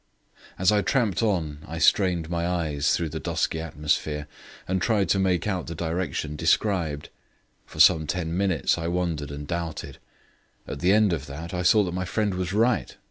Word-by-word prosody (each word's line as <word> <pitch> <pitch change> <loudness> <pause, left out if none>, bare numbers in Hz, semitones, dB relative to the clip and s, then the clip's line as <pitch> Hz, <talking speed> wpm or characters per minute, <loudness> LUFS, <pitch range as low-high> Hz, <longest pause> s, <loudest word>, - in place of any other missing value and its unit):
As 95 +2 +3
I 105 -1 +3
tramped 115 -6 +1
on 85 -9 -1
I 80 - -6
strained 85 0 +3
my 85 0 -1
eyes 80 -5 0
through 85 -2 -2
the 80 +1 -5
dusky 80 - -1
atmosphere 75 -1 -2 0.4
and 95 0 0
tried 100 -2 +1
to 100 - +3
make 95 -2 +1
out 95 -5 -2
the 85 - -5
direction 80 -2 -3
described. 80 -4 0 0.6
For - - -11
some 80 -2 +6
ten 85 +1 -2
minutes 95 -3 +1
I 85 - -3
wondered 85 -5 -2
and 70 0 -6
doubted; 85 -2 -5 0.7
at 70 - -6
the 90 +6 +3
end 105 -2 +4
of 75 -3 -4
that 80 +5 -7
I 90 - -1
saw 105 +4 +5
that 90 -2 -3
my 90 +1 -2
friend 105 +3 -1
was 90 0 -3
right. 115 +4 +1
85 Hz, 185 wpm, -25 LUFS, 80-95 Hz, 0.7 s, some